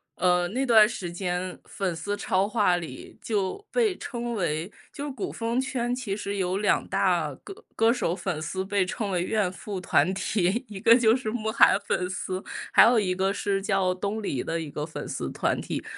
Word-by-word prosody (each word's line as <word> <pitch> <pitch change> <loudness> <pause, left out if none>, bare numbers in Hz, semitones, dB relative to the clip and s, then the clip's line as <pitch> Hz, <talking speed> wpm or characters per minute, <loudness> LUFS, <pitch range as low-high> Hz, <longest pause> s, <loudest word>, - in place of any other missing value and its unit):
呃， 180 0 +2
那 260 +6 -1
段 220 -4 +7
时 175 -6 -5
间， 180 0 -3
粉 190 -3 -3
丝 205 +5 -3
超 190 -1 +1
话 205 -5 +2
里 155 -7 -9
就 215 - -2
被 450 -5 +2
称 240 -4 -4
为 170 -1 -2 0.2
就 290 0 -5
古 255 -6 -4
风 230 +2 -2
圈 250 -2 -1
其 250 -6 -3
实 200 -1 -4
有 185 0 0
两 210 - +1
大 180 -7 +1
歌 395 - -11
歌 225 +1 +4
手 205 -8 0
粉 180 -5 -3
丝 185 +4 -3
被 195 -1 +1
称 200 +2 -3
为 180 -2 0
怨 205 -2 0
妇 190 0 -6
团 185 +1 +2
体， 195 +2 0
一 205 -2 -7
个 230 +4 +7
就 225 -3 +4
是 250 -3 -1
慕 220 -1 -2
寒 - - +6
粉 180 0 -1
丝， 185 0 -4 0.3
还 - - +8
有 235 +1 +5
一 195 -4 +1
个 190 +1 0
是 200 -1 -1
叫 195 -2 +1
东 200 +4 -3
篱 135 -10 -1
的 165 0 -2
一 155 -3 -6
个 150 - -3
粉 155 - -7
丝 - - -4
团 - - 0
体。 - - -4
195 Hz, 220 characters per minute, -26 LUFS, 180-225 Hz, 0.3 s, 还